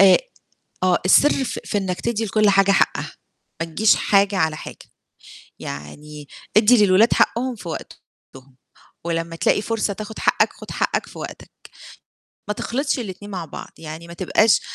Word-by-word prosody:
أ 195 -1 +8 0.7
آه، 180 -1 +3
السر 275 +8 +4
في - - -4
في 210 - -1
إنك 185 -2 -3
تدّي 230 -1 -1
لكُلّ 215 0 +2
حاجة 195 0 +4
حقّها، - - +1 0.5
ما 165 - -1
تجيش 205 +7 +3
حاجة 200 0 +2
على 160 -4 +1
حاجة، - - -9 0.8
يعني 145 - -9 0.3
اِدّي 215 0 +6
للولاد 200 +5 +4
حقّهم 255 +2 +1
في 190 - -9
وقتهم 135 -4 -11 0.5
ولمّا 165 0 -3
تلاقي 205 - +1
فرصة 220 -2 -1
تاخد 215 +2 -8
حقّك - - +2
خُد - - -12
حقّك - - -1
في - - -12
وقتك. - - -8 1.0
ما 210 - -1
تخلطش 275 +7 -2
الاتنين 205 -3 -7
مع 180 -4 -4
بعض، 150 - -9
يعني 160 +1 -8
ما 170 - -9
تبقاش 205 +4 +3
195 Hz, 155 wpm, -21 LUFS, 165-215 Hz, 1.0 s, أ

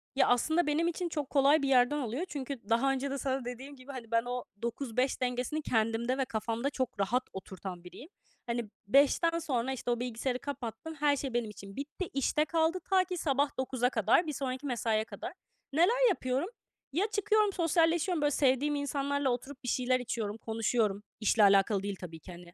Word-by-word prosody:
Ya - - +4
aslında 315 +7 +2
benim 315 +3 +2
için 345 0 -2
çok 295 -4 -3
kolay 285 +2 +4
bir 275 - 0
yerden 255 +2 +4
alıyor. 265 +4 -2
Çünkü 270 - -6
daha 235 +4 +3
önce 270 +1 -2
de 275 - -2
sana 265 -2 -2
dediğim 260 +4 -7
gibi 260 +1 -11
hani 240 -4 -8
ben 230 0 +3
o 245 0 -3 0.2
9-5 250 +2 -1
dengesini 250 +5 -1
kendimde 230 0 0
ve 270 - +1
kafamda 230 +3 -2
çok 260 -6 -3
rahat 240 +6 +1
oturtan 190 -2 -7
biriyim. 245 - -11 0.4
Hani 235 -2 -2 0.2
5'ten 290 - +4
sonra 265 -5 -1
işte 245 -1 -3
o 240 - 0
bilgisayarı 245 +1 -2
kapattım. 275 +2 -6
Her 290 -1 +4
şey 270 -2 -4
benim 235 -2 0
için 200 -1 -10
bitti, 295 +6 -5
işte 275 +3 +1
kaldı. 325 +2 +1
Ta 380 -1 +5
ki 365 0 -5
sabah 285 -3 0
9'a 260 -1 0
kadar, 255 - +3
bir 300 - -2
sonraki 260 0 -3
mesaiye 225 -4 0
kadar. - - -7 0.4
Neler 460 - +4
yapıyorum? 270 -1 -1 0.4
Ya 385 +7 +2
çıkıyorum 425 0 +2
sosyalleşiyorum 335 0 +2
böyle 290 0 +3
sevdiğim 280 +2 +2
insanlarla 285 -1 0
oturup 265 +3 -4
bir - - -6
şeyler 255 +1 +2
içiyorum, 225 -3 -3
konuşuyorum. 220 -2 0 0.2
İşle 215 0 +3
alakalı 195 0 +4
değil, 200 0 -3
tabi 165 -3 -9
ki, 180 - -11
hani. 175 0 -12
260 Hz, 185 wpm, -31 LUFS, 230-295 Hz, 0.4 s, Ta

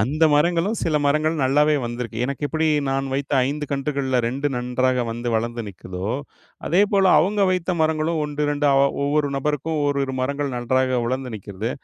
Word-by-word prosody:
அந்த 150 +9 +2
மரங்களும் 170 +7 +1
சில 155 -2 +1
மரங்களும் 155 +1 +1
நல்லாவே 150 +3 +3
வந்திருக்கு. 120 -1 -5
எனக்கு 140 +2 -4
எப்படி 160 0 0 0.2
நான் 135 0 -1
வைத்த 140 +1 -3
5 150 +1 -3
கன்றுகள்ல, 135 -2 -1
2 140 +4 -1
நன்றாக 125 0 0
வந்து 120 +1 -4
வளந்து 120 +1 -3
நிக்குதோ, 95 +1 -6 0.6
அதேபோல 195 +2 +3
அவுங்க 200 +3 +1
வைத்த 180 0 -1
மரங்களும் 155 +1 0
1 150 0 -2
2 145 0 +1 0.4
ஒவ்வொரு 145 0 +1
நபருக்கும் 150 +2 -1
1,2 140 -2 -1
மரங்கள் 140 0 -2
நன்றாக 130 +1 +1
வளர்ந்து 130 -1 -3
நிக்கிறது. 100 +3 -5
140 Hz, 150 wpm, -22 LUFS, 125-155 Hz, 0.6 s, நல்லாவே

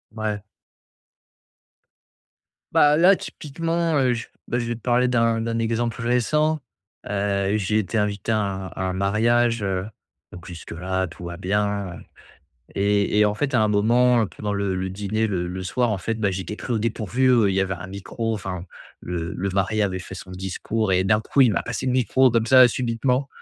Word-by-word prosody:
Ouais. 105 -2 -3 2.3
Bah 150 0 +5
là, 185 +4 +6
typiquement, 165 +2 -2
heu, 130 -3 +3
je 115 -1 -5 0.2
bah 120 - 0
je 120 - -2
vais 120 - -2
te 115 - -12
parler 125 0 +2
d'un 115 -2 +2
d'un 115 0 -2
exemple 115 +1 -1
récent. 150 +6 +1 0.5
Heu, 100 0 0
j'ai 105 +1 +1
été 110 +3 -2
invité 105 0 -1
à 110 - +2
un 95 -2 -3
à 95 - -7
un - - -2
mariage, 115 +4 +2
heu, 95 -1 -1 0.5
donc 90 -2 -10
jusque-là, 90 +2 -4
tout 85 +1 -12
va 85 0 -6
bien. 100 -1 -1 0.8
Et 100 +1 +1
et 105 - +5
en 105 - 0
fait, 140 +5 -2
à 120 - +4
un 110 - +3
moment, 115 +2 +3
pendant 105 +1 -4
le 100 -1 -1
le 95 0 -2
dîner, 105 +3 -1
le 90 -4 -2
le 95 +1 -5
soir, 120 +5 0
en 100 - -1
fait, 115 +5 -2
bah 110 -3 0
j'ai 95 0 -3
été 105 - -6
pris 125 - -5
au 115 - +1
dépourvu, 115 +3 0
heu, 115 -5 +4
il 95 - -1
y 95 - +2
avait 95 -1 -1
un 90 - -8
micro 100 +4 -4
enfin 95 -4 -4 0.4
le 85 +1 -4
le 100 +2 -2
mari 100 +3 0
avait 95 -2 -1
fait - - -9
son - - -10
discours 95 +3 -2
et 95 0 +3
d'un 105 +2 +3
coup 135 +5 +3
il 120 -4 +4
m'a - - 0
passé 115 -1 -4
le 130 - +1
micro 130 +1 +3
comme 115 -1 +1
ça 130 +1 +8
subitement 125 +3 0
105 Hz, 195 wpm, -23 LUFS, 95-120 Hz, 2.3 s, ça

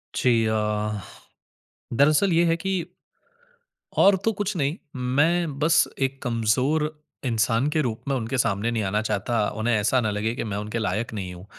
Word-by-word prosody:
जी। 115 -3 +3
अ, 105 -1 -1 1.0
दरअसल 155 +7 +4
ये 170 +1 +4
है 165 0 +2
कि 190 +1 -1 1.1
और 200 0 +5
तो 225 - +4
कुछ 205 -1 -2
नहीं 145 0 0 0.4
मैं 165 -1 +2
बस 160 +2 +4 0.2
एक 135 0 -1
कमज़ोर 125 +6 +1 0.4
इंसान 115 +2 +1
के 155 +1 +1
रूप 115 -4 -3
में 135 - +1
उनके 125 +2 -2
सामने 105 +1 0
नहीं 110 -2 -1
आना 105 +2 0
चाहता, 110 +1 0
उन्हें 115 +2 -1
ऐसा 115 +5 +2
ना 110 -2 0
लगे 110 +3 -1
कि - - -3
मैं 105 -3 -3
उनके 105 +3 -3
लायक 110 +2 -2
नहीं 95 -4 -5
हूँ। 90 +2 -11
120 Hz, 170 wpm, -24 LUFS, 110-150 Hz, 1.1 s, और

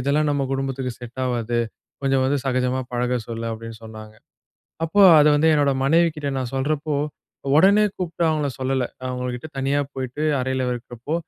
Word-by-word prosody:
இதெல்லாம் 145 +4 +1
நம்ம 145 -1 0
குடும்பத்துக்கு 135 -1 -2
செட் 125 +1 -8
ஆவாது. 120 -1 -1 0.4
கொஞ்சம் 135 -1 +2
வந்து 140 +2 +1
சகஜமா 130 0 0
பழக 125 +1 0
சொல்லு, 115 0 -4
அப்படின்னு 115 0 -8
சொன்னாங்க. 110 -1 -10 0.7
அப்போ 200 +6 +2 0.2
அத 150 - +6
வந்து 160 +2 +3
என்னோட 145 -2 +3
மனைவிகிட்ட 155 -1 +2
நான் 130 -1 -4
சொல்றப்போ, 150 +2 -1 0.6
உடனே 200 +6 +6
கூப்பிட்டு 170 -2 -3
அவங்கள 150 -2 0
சொல்லல. 130 -1 0 0.2
அவங்கள்கிட்ட 125 +2 -4
தனியா 140 +2 +1
போய்விட்டு 130 +3 -5 0.2
அறையில 130 0 -1
இருக்கிறப்போ, 120 +4 -6
130 Hz, 150 wpm, -22 LUFS, 125-145 Hz, 0.7 s, அத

